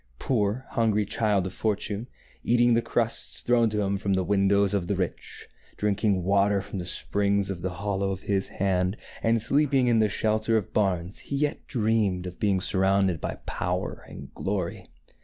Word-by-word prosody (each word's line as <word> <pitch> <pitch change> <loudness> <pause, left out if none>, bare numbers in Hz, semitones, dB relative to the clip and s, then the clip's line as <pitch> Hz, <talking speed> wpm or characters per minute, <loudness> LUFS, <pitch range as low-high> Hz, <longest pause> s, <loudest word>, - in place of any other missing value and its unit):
Poor, 110 - 0
hungry 110 -5 +1
child 105 -2 +1
of 95 - -5
Fortune, 105 +1 -2 0.4
eat 120 +1 +2
ing 120 0 +5
the 115 - +3
crusts 115 0 -1
thrown 120 -2 +3
to 105 -1 -1
him 100 0 0
from 100 0 -1
the 95 -1 +1
windows 100 +1 +3
of 95 -4 0
the 100 - 0
rich, 95 -2 -4 0.3
drinking 105 -2 +1
water 100 +2 +3
from 95 0 -6
the 90 - -5
springs 100 -1 0
in 90 -3 -6
the 95 - -1
hollow 100 +1 -2
of 95 -1 -4
his 100 -1 0
hand, 95 +1 0 0.2
and 115 0 +2
sleeping 135 +3 +2
in 120 -2 +3
the 110 -1 +3
shelter 110 +2 +1
of 105 - -4
barns, 95 -3 0
he 140 - -5
yet 145 +1 -1
dreamed 105 -6 +1
of 90 -1 -8
being 100 -3 +2
sur 95 +1 0
rounded 95 -4 +2
by - - -3
power 90 +1 -3
and - - -10
glory. 95 -3 -3
100 Hz, 185 wpm, -26 LUFS, 95-110 Hz, 0.4 s, ing